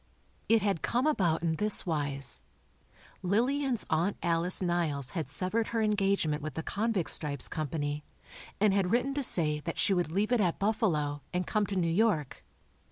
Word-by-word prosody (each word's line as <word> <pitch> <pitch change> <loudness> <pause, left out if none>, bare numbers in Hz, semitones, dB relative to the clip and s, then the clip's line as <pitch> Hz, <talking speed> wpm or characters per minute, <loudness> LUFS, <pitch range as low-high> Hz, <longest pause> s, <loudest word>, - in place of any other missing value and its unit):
It 225 -2 +3
had 200 -6 0
come 245 +3 0
about 180 - +1
in 160 -1 0
this 210 +2 +4
wise: 145 -6 0 0.8
Lillian's 245 +6 0
Aunt 170 +6 0
Alice 170 +1 +2
Niles 165 -7 -1
had 160 -7 -4
severed 185 +9 0
her 230 -1 -2
engagement 195 -7 0
with 155 +1 -6
the 160 - -4
"Convict 210 -3 -1
Stripes" 140 -3 +1
Company, 150 -1 -4 0.6
and 205 -1 +3
had 195 -2 +1
written 250 +5 0
to 285 - -2
say 155 - +4
that 165 +2 -6
she 200 - +2
would 175 -4 -1
leave 205 +6 -1
it 245 -3 +3
at 175 -4 0
Buffalo, 165 - -1
and 180 0 -2
come 210 -2 0
to 200 - -4
New 175 -3 0
York. 165 - 0
180 Hz, 170 wpm, -29 LUFS, 155-215 Hz, 0.8 s, this